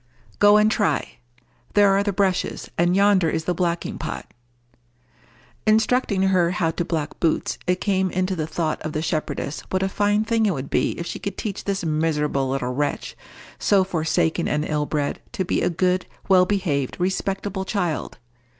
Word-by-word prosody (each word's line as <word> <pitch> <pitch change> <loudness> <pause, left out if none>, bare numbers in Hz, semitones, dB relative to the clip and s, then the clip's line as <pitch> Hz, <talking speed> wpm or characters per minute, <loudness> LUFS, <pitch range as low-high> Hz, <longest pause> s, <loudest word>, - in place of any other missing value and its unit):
"Go 205 0 +7
and 210 +1 +4
try. 150 - 0 0.6
There 205 -1 +6
are 195 +1 +3
the 200 0 0
brushes, 190 -2 -1
and 175 +1 +2
yonder 195 -4 +4
is 160 0 -1
the 180 - +1
blacking 175 -1 -2
pot." - - -6 1.3
Instructing 215 -2 +3
her 185 -3 +3
how 170 -2 0
to 175 - -2
black 160 -4 -3
boots, 165 -2 0
it 180 0 +1
came 190 -2 +1
into 185 +1 -1
the 155 -3 -2
thought 160 -1 -2
of 155 - -4
the 155 - -2
shepherdess 155 -2 -2
what 185 0 0
a - - +2
fine 205 +2 +1
thing 225 -1 +1
it 190 - +1
would 135 0 -6
be - - +1
if 170 - -4
she - - -5
could 200 -1 -5
teach 205 -3 -4
this 195 -3 -1
miserable 150 -3 0
little 130 -2 -1
wretch, 145 +2 -2 0.4
so 200 -2 +4
forsaken 165 -1 0
and 150 +1 0
ill 150 -1 -1
bred, 145 -2 -2
to 190 - -1
be - - 0
a 175 - +2
good, 180 +2 0 0.2
well 185 -1 +5
behaved, 165 -10 -1
respectable 190 +1 -1
child. 180 -6 -2
180 Hz, 175 wpm, -23 LUFS, 160-195 Hz, 1.3 s, Go